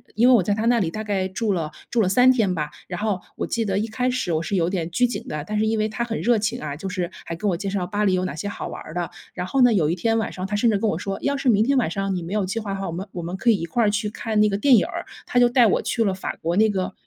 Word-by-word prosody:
因 235 +3 +4
为 - - +7
我 230 - +6
在 205 - +1
她 215 - -2
那 240 0 +4
里 170 -5 0
大 215 +4 -5
概 195 -3 -1
住 205 +3 -2
了 160 -4 -2 0.2
住 235 - +2
了 190 - +2
3 250 +5 +6
天 215 -7 +2
吧。 150 -2 -2 0.2
然 180 -1 -5
后 210 -4 0 0.2
我 - - -2
记 230 -1 -1
得 195 -1 0
一 215 - 0
开 250 +3 -1
始 250 -9 -1
我 160 - +1
是 195 +4 -2
有 170 -2 +2
点 175 -3 -2
拘 245 +8 +3
谨 245 - -5
的， 150 -1 -4
但 215 - -2
是 220 - +2
因 220 0 +1
为 215 0 0
她 235 +2 -2
很 225 -1 -3
热 235 -1 +3
情 225 +4 -2
啊， 145 -2 -4
就 195 - -5
是 185 -1 -3
还 165 - -4
跟 200 +5 -1
我 175 - 0
介 195 +2 -3
绍 190 -2 -1
巴 210 +2 0
黎 190 - +3
有 185 0 +1
哪 140 - -3
些 160 - -4
好 200 - -5
玩 - - -7
儿 155 - -10
的。 175 -1 -2 0.2
然 180 - -4
后 265 +7 +1
呢， 245 -2 +6
有 160 -6 +2
一 170 - +1
天 225 +5 +1
晚 220 - -1
上 185 +1 -5
她 205 - -2
甚 230 +3 +3
至 205 - +2
跟 215 +1 0
我 160 - -1
说： 195 +2 -4
“要 280 - 0
是 270 -2 +1
明 215 -1 +4
天 275 0 +2
晚 235 - +2
上 195 0 -1
你 175 - -3
没 170 - -7
有 205 -3 +1
计 225 +5 -2
划 200 -2 -4
的 195 - -4
话， 195 - -3
我 - - -3
们 185 +4 -4
我 175 - -5
们 175 +2 -4
可 235 +5 +1
以 220 - +6
一 165 - -3
块 230 +8 0
儿 210 - +4
去 210 0 -1
看 220 0 -2
那 210 - +5
个 195 - -1
电 260 +5 +4
影 - - +3
儿。” - - -5 0.2
她 245 - -2
就 245 0 +5
带 245 -2 +5
我 - - +2
去 230 - 0
了 195 - +1
法 185 - -4
国 170 +2 -1
那 220 +2 +4
个 190 -2 -2
205 Hz, 380 characters per minute, -23 LUFS, 185-225 Hz, 0.2 s, 为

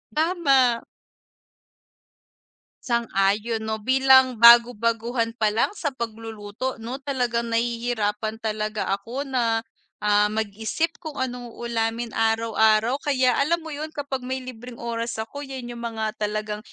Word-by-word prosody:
Tama. 275 -8 +3 2.0
Sang-ayon 220 -2 0
'no, 220 0 -3
bilang 260 +2 +5
bagu 235 +1 +9
baguhan 230 +1 0
palang 215 - +2
sa 370 -6 -4
pagluluto 225 +1 -5
'no, 250 +4 -5
talagang 245 -4 -1
nahihirapan 230 -2 -1
talaga 215 -1 -2
ako 230 +8 -3
na, 235 -5 0 0.4
ah, 210 0 +4
mag-isip 220 +9 -2
kung 315 -3 -8
anong 250 -2 -3
uulamin 230 0 -2
araw-araw. 225 +2 +2
Kaya 255 -4 +2
alam 335 +3 +1
mo 320 - -7
'yun 300 +1 -4
kapag 285 -2 -3
may 260 0 -3
libreng 250 -1 -9
oras 230 0 -4
ako 220 +6 -6
'yan 260 -3 -6
'yung 240 - -8
mga 225 -2 -3
talagang 210 0 -2
235 Hz, 120 wpm, -24 LUFS, 220-260 Hz, 2.0 s, bagu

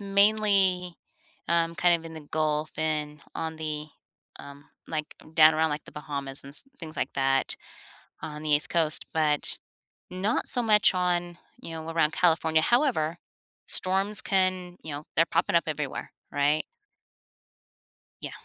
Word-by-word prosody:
mainly, 200 -3 +3 0.5
um, 170 0 +1
kind 175 +2 +4
of 165 - -13
in 160 - -9
The 150 -2 -11
Gulf 155 0 0
and 150 -1 -2
on 160 0 -4
the, 155 -1 -4 0.5
um, 140 0 -12 0.2
like, 155 -1 -4 0.2
down 155 -1 +7
around, 160 0 +2
like, 150 +1 -4
The - - -14
Bahamas 140 -2 -4
and 140 - -9
s 140 - +1
things 160 -3 -9
like - - -2
that 135 0 +1 0.7
on 150 -1 -6
the 155 - -3
East 145 +1 +4
Coast, 160 -2 +1
but 150 -2 +1 0.5
not 190 +5 -1
so 245 - +5
much 210 -3 +4
on, 175 -1 0 0.2
you - - -8
know, 160 0 -6
around 165 -2 +2
California. 160 -2 +3
However, 205 - +2 0.5
storms 195 +3 +1
can 185 -2 0
you 160 - -7
know, 145 +2 -7
they're 165 - +5
popping - - +1
up 170 - +4
everywhere, 150 -3 -4 0.2
right? 145 +2 +1 1.6
Yeah. - - -5
160 Hz, 150 wpm, -27 LUFS, 150-180 Hz, 1.6 s, down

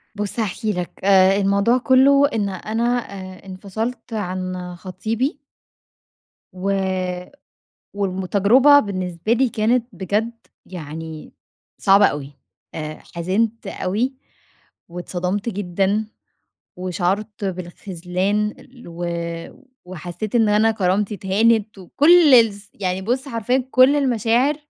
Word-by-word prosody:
بُص 205 +3 -4
هاحكي 215 0 -1
لك. 180 -1 -4
آآ 195 0 +5
الموضوع 200 +5 +2
كُلّه 275 +3 +5
إن 205 -3 0
أنا 215 +5 -3 0.3
آآ 185 -1 -9
انفصلت 220 +6 -5
عن 185 -3 -4
خطيبي 220 - -3 1.1
و 185 +1 -3 1.2
والم 190 -2 -2
تجربة 255 +10 +5
بالنسبة 185 -2 -2
لي 255 +1 +2
كانت 230 +2 +1
بجد 205 +5 -1 0.3
يعني 160 -2 -8 0.4
صعبة 200 0 +5
أوي. 145 -3 -2 0.4
أ 155 -1 -5 0.2
حِزِنْت 205 +7 -1
أوي، 220 +9 -2 0.8
واتصدمت 180 +4 -3
جدًا 200 +1 -1 0.7
وشَعُرت 190 +4 -2
بالخذلان 185 +2 -2 0.3
و 170 +1 -5 0.8
وحسّيت 180 +4 -7
إن 225 -3 +4
أنا 215 +2 +4
كرامتي 200 0 0
اتهانت، 210 +2 +1
وكل 295 - +5
الس 205 -4 +3
يعني 185 -1 -2
بُص 255 +6 -2
حرفيًا 230 0 -1
يعني 260 -1 0
كل 260 +3 +5
المشاعر 250 +1 +2
200 Hz, 105 wpm, -21 LUFS, 185-230 Hz, 1.2 s, آآ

